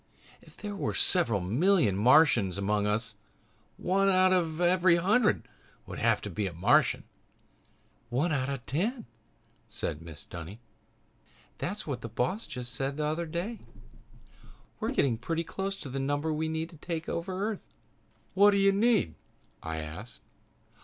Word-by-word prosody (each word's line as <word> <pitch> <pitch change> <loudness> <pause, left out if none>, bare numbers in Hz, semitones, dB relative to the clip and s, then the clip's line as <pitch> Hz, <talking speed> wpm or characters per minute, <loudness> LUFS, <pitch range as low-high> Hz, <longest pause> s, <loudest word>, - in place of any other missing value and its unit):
"If - - -18
there 205 -1 -6
are - - -1
several 115 - +3
million 120 - +2
Martians 115 - +4
among 105 +1 0
us, 110 +2 0 0.6
one 195 +2 +2
out 185 0 +5
of 165 -3 0
every 175 0 +4
hundred 210 +6 +2 0.4
would - - -7
have - - +2
to - - -5
be 105 -2 -2
a 90 - -6
Martian." 85 - +3 1.1
"One 140 +8 0
out 135 -2 0
of - - -1
every 125 - -11
ten!" 210 - -1 0.6
said 75 - -3
Mrs. 80 -2 -9
Dunny. 85 +5 -8 1.0
"That's 205 +4 -3
what 135 -6 -4
the 115 - -6
boss 125 - -1
said - - -12
just 125 -3 -5
the 140 +3 -1
other 160 +3 -2
day. 180 +8 -4 1.2
'We're - - -1
getting 120 -5 +1
pretty 165 +5 -2
close 195 +3 -4
to 195 - -8
the 135 +2 -3
number 145 +3 -1
we 160 +1 -1
need 160 +2 -3
to 165 - -14
take 165 +1 -5
over 185 +2 -3
Earth.'" 210 - -10 0.6
"What 200 +2 +6
do 200 - +3
you 195 0 +5
need?" 205 - +2 0.5
I 80 -1 -4
asked. 80 +10 -9
155 Hz, 160 wpm, -29 LUFS, 115-185 Hz, 1.2 s, What